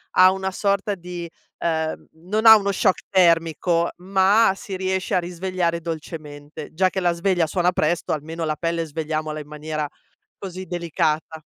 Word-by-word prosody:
ha 185 Hz, 0 st, +7 dB
una 190 Hz, 0 st, -2 dB
sorta 200 Hz, +1 st, 0 dB
di 175 Hz, -1 st, -7 dB, 0.3 s
ehm, 160 Hz, -1 st, -2 dB
non 205 Hz, +8 st, -1 dB
ha 220 Hz, 0 st, +11 dB
uno 200 Hz, -1 st, -1 dB
shock 190 Hz, -1 st, +1 dB
termico, 170 Hz, -1 st, +3 dB
ma 190 Hz, +3 st, +3 dB
si 195 Hz, 0 st, -7 dB
riesce 190 Hz, 0 st, -2 dB
a -, -, +4 dB
risvegliare 175 Hz, -1 st, -2 dB
dolcemente; 155 Hz, -2 st, -7 dB
già 185 Hz, +3 st, +3 dB
che 190 Hz, -, -3 dB
la 175 Hz, -1 st, +2 dB
sveglia 175 Hz, -1 st, +1 dB
suona 180 Hz, +2 st, +1 dB
presto, 170 Hz, 0 st, 0 dB
almeno 160 Hz, +2 st, -4 dB
la 155 Hz, -1 st, -1 dB
pelle 165 Hz, +1 st, -2 dB
svegliamola 155 Hz, 0 st, -3 dB
in 150 Hz, -, -9 dB
maniera, 150 Hz, 0 st, -4 dB, 0.5 s
così, 185 Hz, -1 st, -7 dB
delicata. 160 Hz, -2 st, -2 dB
170 Hz, 155 wpm, -22 LUFS, 160-190 Hz, 0.5 s, ha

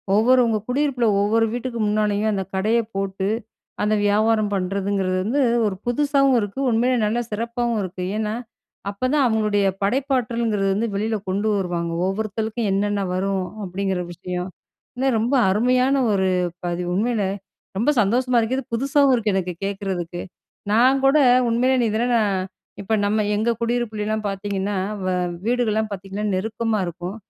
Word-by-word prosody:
ஒவ்வொருவங்க 235 Hz, 0 st, +4 dB
குடியிருப்புல 255 Hz, -2 st, +1 dB
ஒவ்வொரு 225 Hz, +3 st, +2 dB
வீட்டுக்கு 245 Hz, -1 st, -4 dB
முன்னாலயும் 210 Hz, 0 st, +1 dB
அந்த 195 Hz, -1 st, -1 dB
கடைய 215 Hz, +5 st, +2 dB, 0.2 s
போட்டு, 195 Hz, 0 st, -2 dB, 0.6 s
அந்த 210 Hz, +1 st, +2 dB
வியாபாரம் 215 Hz, 0 st, +2 dB
பண்றதுங்கிறது 195 Hz, 0 st, -1 dB
வந்து 255 Hz, +8 st, 0 dB, 0.2 s
ஒரு 200 Hz, -2 st, -1 dB
புதுசாவும் 275 Hz, +1 st, +3 dB
இருக்கு, 205 Hz, +4 st, -4 dB
உண்மையிலே 245 Hz, +2 st, +2 dB
நல்ல 220 Hz, +3 st, 0 dB
சிறப்பாவும் 235 Hz, +1 st, -1 dB
இருக்கு. 185 Hz, 0 st, -5 dB
ஏன்னா, 215 Hz, -1 st, -1 dB, 0.6 s
அப்பதான் 255 Hz, +8 st, +1 dB
அவங்களுடைய 215 Hz, -3 st, +1 dB, 0.2 s
படைப்பாற்றல்ங்கிறது 235 Hz, -4 st, 0 dB
வந்து 220 Hz, +4 st, 0 dB
வெளில 220 Hz, +2 st, -1 dB
கொண்டு 200 Hz, +3 st, 0 dB
வருவாங்க, 175 Hz, -3 st, -2 dB
ஒவ்வொருத்தருக்கும் 215 Hz, +3 st, -2 dB
என்னென்ன 205 Hz, +1 st, 0 dB
வரும் 190 Hz, +1 st, 0 dB, 0.2 s
அப்டிங்கிற 190 Hz, 0 st, -2 dB
விஷயம். 180 Hz, +1 st, -5 dB, 0.5 s
இன்னும் 260 Hz, 0 st, +1 dB
ரொம்ப 240 Hz, +5 st, +1 dB
அருமையான 250 Hz, +6 st, +2 dB, 0.2 s
ஒரு 190 Hz, -1 st, +2 dB, 0.4 s
பதிவு. 175 Hz, 0 st, -2 dB
உண்மையிலே, 210 Hz, 0 st, 0 dB, 0.5 s
ரொம்ப 230 Hz, +8 st, +2 dB
சந்தோஷமா 245 Hz, +5 st, +2 dB
இருக்கு, 230 Hz, +3 st, 0 dB
இது 270 Hz, -, -3 dB
புதுசாவும் 275 Hz, +2 st, +3 dB
இருக்கு 215 Hz, -4 st, 0 dB
எனக்கு 180 Hz, -2 st, -1 dB
கேட்கிறதுக்கு. 190 Hz, -3 st, -4 dB, 0.5 s
நான் 255 Hz, +5 st, +4 dB
கூட 270 Hz, +3 st, +5 dB, 0.3 s
உண்மையிலே 250 Hz, +3 st, +2 dB
நீ 235 Hz, -, +2 dB
இதெல்லாம் 240 Hz, +3 st, 0 dB
நான் 195 Hz, -4 st, 0 dB, 0.3 s
இப்போ 200 Hz, +2 st, -2 dB
நம்ம 210 Hz, +1 st, +1 dB
எங்க 220 Hz, +3 st, 0 dB
குடியிருப்புலலாம் 220 Hz, -3 st, -1 dB
பார்த்தீங்கன்னா, 200 Hz, 0 st, -2 dB, 0.3 s
வ -, -, -1 dB, 0.4 s
வீடுகள்லாம் 220 Hz, -3 st, +1 dB
பார்த்தீங்கன்னா 195 Hz, +2 st, -5 dB
நெருக்கமா 220 Hz, +3 st, -1 dB
இருக்கும். 175 Hz, +3 st, -6 dB
215 Hz, 135 wpm, -22 LUFS, 195-240 Hz, 0.6 s, கூட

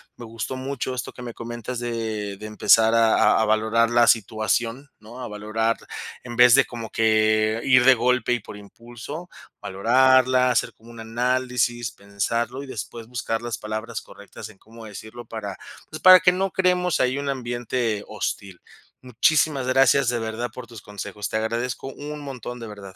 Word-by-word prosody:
Me 120 Hz, -, -11 dB
gustó 115 Hz, +3 st, -5 dB
mucho 130 Hz, 0 st, -4 dB
esto 125 Hz, -, -5 dB
que -, -, -12 dB
me 120 Hz, -, -7 dB
comentas 120 Hz, +1 st, -6 dB
de 110 Hz, -4 st, -4 dB
de 105 Hz, -, -9 dB
empezar 110 Hz, +1 st, +4 dB
a 115 Hz, -1 st, +4 dB, 0.2 s
a -, -, +2 dB
a -, -, +2 dB
valorar 110 Hz, +2 st, +2 dB
la 120 Hz, 0 st, +4 dB
situación, 115 Hz, +4 st, 0 dB
¿no? 110 Hz, +4 st, -12 dB
A -, -, -5 dB
valorar, 110 Hz, +2 st, -1 dB, 0.5 s
en 120 Hz, -1 st, -8 dB
vez 125 Hz, 0 st, +8 dB
de 135 Hz, -, +6 dB
como 115 Hz, -2 st, -8 dB
que 110 Hz, 0 st, +2 dB
ir 130 Hz, -2 st, +5 dB
de 130 Hz, +1 st, +7 dB
golpe 125 Hz, 0 st, +1 dB
y 120 Hz, -, 0 dB
por 105 Hz, 0 st, -11 dB
impulso, 120 Hz, -, -10 dB, 0.3 s
valorarla, 130 Hz, +4 st, +3 dB
hacer 120 Hz, -, 0 dB
como 115 Hz, +1 st, -16 dB
un 115 Hz, -, -12 dB
análisis, 120 Hz, 0 st, -1 dB
pensarlo 115 Hz, +6 st, -3 dB
y 140 Hz, -, -9 dB
después 115 Hz, -2 st, -7 dB
buscar 115 Hz, -2 st, -3 dB
las 120 Hz, 0 st, -4 dB
palabras 110 Hz, +1 st, -5 dB
correctas 100 Hz, +1 st, -12 dB
en 100 Hz, -, -18 dB
cómo 115 Hz, 0 st, -14 dB
decirlo 110 Hz, +3 st, -10 dB
para, 105 Hz, -4 st, -6 dB, 0.3 s
pues, 155 Hz, -, -8 dB
para 185 Hz, 0 st, +9 dB
que 180 Hz, -, +4 dB
no 190 Hz, +1 st, -1 dB
creemos 180 Hz, -2 st, +1 dB
ahí 130 Hz, +1 st, +1 dB
un 140 Hz, 0 st, -4 dB
ambiente 120 Hz, -4 st, -2 dB
hostil. 100 Hz, -3 st, -5 dB, 0.4 s
Muchísimas 135 Hz, +3 st, +1 dB
gracias, 135 Hz, 0 st, +4 dB
de 120 Hz, -1 st, -1 dB
verdad, 115 Hz, +2 st, -4 dB
por 125 Hz, -2 st, -9 dB
tus 115 Hz, -3 st, -11 dB
consejos. 105 Hz, 0 st, -6 dB
Te 110 Hz, -, -1 dB
agradezco 120 Hz, +4 st, -3 dB
un 150 Hz, +2 st, -7 dB
montón, 125 Hz, -3 st, -7 dB
de 115 Hz, -, -7 dB
verdad. 100 Hz, -3 st, -11 dB
115 Hz, 180 wpm, -23 LUFS, 110-125 Hz, 0.5 s, para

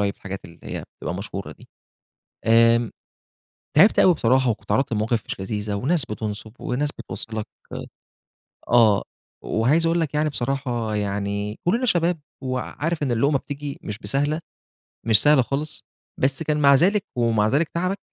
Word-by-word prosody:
الحاجات 100 Hz, 0 st, -7 dB
اللي 85 Hz, -1 st, -15 dB
هي -, -, -5 dB
بتبقى 90 Hz, -, -4 dB
مشهورة 100 Hz, 0 st, -6 dB
دي. -, -, -15 dB, 0.8 s
آمم 115 Hz, 0 st, +4 dB, 0.9 s
تعبت 200 Hz, +7 st, +6 dB
أوي 180 Hz, -2 st, +6 dB
بصراحة، 130 Hz, -1 st, +2 dB
وكنت 110 Hz, -, -4 dB
اتعرضت 135 Hz, -2 st, +1 dB
لمواقف 110 Hz, +1 st, 0 dB
مش -, -, -5 dB
لذيذة، 105 Hz, +1 st, -3 dB
وناس 140 Hz, -, +1 dB
بتنصب، 105 Hz, 0 st, -5 dB
وناس 140 Hz, +4 st, -1 dB
بتبص -, -, -6 dB
لَك 110 Hz, -1 st, -3 dB, 1.2 s
آآ -, -, -6 dB
آه. 110 Hz, -4 st, +5 dB, 0.4 s
وعايز 145 Hz, +9 st, +2 dB
أقول 170 Hz, +1 st, +2 dB
لك 155 Hz, -3 st, -2 dB
يعني 150 Hz, +1 st, +2 dB
بصراحة 125 Hz, -5 st, -1 dB
يعني 100 Hz, +1 st, -2 dB
كلنا 230 Hz, +9 st, +1 dB
شباب، 175 Hz, -5 st, +2 dB, 0.2 s
وعارف 145 Hz, +5 st, -3 dB
إن 130 Hz, -4 st, 0 dB
اللقمة 140 Hz, +4 st, +2 dB
بتيجي 145 Hz, 0 st, -6 dB
مش 105 Hz, 0 st, -5 dB
بسهلة، 145 Hz, +5 st, 0 dB, 0.7 s
مش 110 Hz, -1 st, +7 dB
سهلة 145 Hz, -3 st, +6 dB
خالص. 140 Hz, +5 st, -3 dB, 0.4 s
بس 135 Hz, +3 st, +1 dB
كان 150 Hz, -1 st, 0 dB
مع 140 Hz, -1 st, +6 dB
ذلك 195 Hz, +8 st, +3 dB
ومع 115 Hz, -3 st, +2 dB
ذلك 150 Hz, +5 st, +2 dB
تعبك 185 Hz, +3 st, -2 dB
130 Hz, 150 wpm, -23 LUFS, 110-150 Hz, 1.2 s, مش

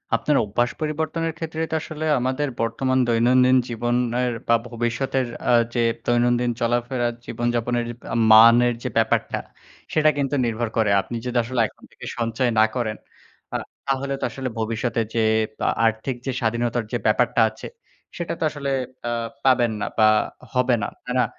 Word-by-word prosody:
আপনার 150 Hz, -, +1 dB
অভ্যাস 120 Hz, +4 st, 0 dB
পরিবর্তনের 160 Hz, +2 st, -2 dB
ক্ষেত্রে 160 Hz, -1 st, -4 dB
তো -, -, 0 dB
আসলে 155 Hz, 0 st, -5 dB
আমাদের 130 Hz, +4 st, -1 dB
বর্তমান 130 Hz, +3 st, 0 dB
দৈনন্দিন 125 Hz, +2 st, +4 dB
জীবনের 120 Hz, +1 st, 0 dB, 0.2 s
বা 115 Hz, -, +5 dB
ভবিষ্যতের 125 Hz, +2 st, -1 dB, 0.2 s
আ -, -, +5 dB, 0.2 s
যে 120 Hz, -, +1 dB, 0.2 s
দৈনন্দিন 120 Hz, 0 st, +2 dB
চলাফেরার 120 Hz, +1 st, 0 dB
জীবনযাপনের 120 Hz, 0 st, -1 dB, 0.5 s
মানের 115 Hz, +2 st, +7 dB
যে 125 Hz, -, -2 dB
ব্যাপারটা, 110 Hz, -1 st, +1 dB, 0.5 s
সেটা 155 Hz, 0 st, +4 dB
কিন্তু 140 Hz, 0 st, 0 dB
নির্ভর 115 Hz, 0 st, -1 dB
করে। 110 Hz, -2 st, +3 dB
আপনি 120 Hz, -, -7 dB
যদি 125 Hz, 0 st, -2 dB
আসলে 120 Hz, +2 st, -3 dB
এখন -, -, -22 dB
থেকে -, -, -12 dB
সঞ্চয় 120 Hz, +1 st, 0 dB
না 110 Hz, -, +7 dB
করেন, 110 Hz, -4 st, -2 dB, 0.6 s
আ -, -, +3 dB, 0.3 s
তাহলে 135 Hz, 0 st, -1 dB
তো -, -, -7 dB
আসলে 130 Hz, -1 st, -4 dB
ভবিষ্যতে 115 Hz, +1 st, -1 dB
যেয়ে 110 Hz, -1 st, +2 dB, 0.5 s
আর্থিক 115 Hz, +3 st, 0 dB
যে 135 Hz, -, -1 dB
স্বাধীনতার 120 Hz, +1 st, 0 dB
যে -, -, +2 dB
ব্যাপারটা -, -, +2 dB
আছে, -, -, -10 dB, 0.5 s
সেটা 170 Hz, -, -3 dB
তো -, -, -2 dB
আসলে 145 Hz, -2 st, -5 dB, 0.4 s
আ -, -, -1 dB, 0.3 s
পাবেন 125 Hz, -3 st, +4 dB
না -, -, 0 dB
বা 110 Hz, -1 st, +6 dB, 0.5 s
হবে 125 Hz, -1 st, +3 dB
না। -, -, -1 dB, 0.2 s
তাই 125 Hz, -, -4 dB
না? 125 Hz, -, +4 dB
120 Hz, 155 wpm, -23 LUFS, 115-130 Hz, 0.6 s, মানের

